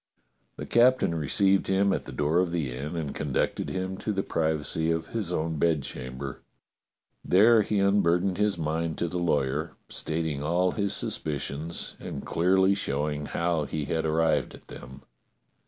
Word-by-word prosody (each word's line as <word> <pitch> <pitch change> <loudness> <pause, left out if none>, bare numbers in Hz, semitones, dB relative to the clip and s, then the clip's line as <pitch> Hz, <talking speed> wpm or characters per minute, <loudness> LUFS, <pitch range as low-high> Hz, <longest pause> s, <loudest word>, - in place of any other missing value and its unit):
The - - -6
captain 125 -5 +4
received 95 +6 +2
him 95 0 +2
at - - -3
the - - -8
door 75 +4 +1
of 90 -2 +1
the 75 -8 -2
inn 75 +6 -5
and 80 -4 -3
conducted 70 -3 -1
him 95 0 -3
to 105 - -3
the 95 -1 -1
privacy 80 0 -1
of 80 0 -1
his 105 -6 -3
own 80 -2 -1
bedchamber. 70 -4 -2 0.8
There 110 +4 +6
he 105 0 -1
unburdened 100 -2 +2
his 105 -3 +2
mind 80 0 -2
to 85 - -1
the 90 +2 -3
lawyer, 75 -1 0 0.2
stating 80 -3 -2
all 90 +4 +1
his 100 -2 -1
suspicions 75 +2 -3
and - - -6
clearly 95 +3 +3
showing 75 -4 -2
how 85 -3 0
he 75 +1 -3
had 80 +3 -1
ar 80 - 0
rived 80 0 +1
at - - -18
them. 65 +2 -11
80 Hz, 160 wpm, -27 LUFS, 75-95 Hz, 0.8 s, There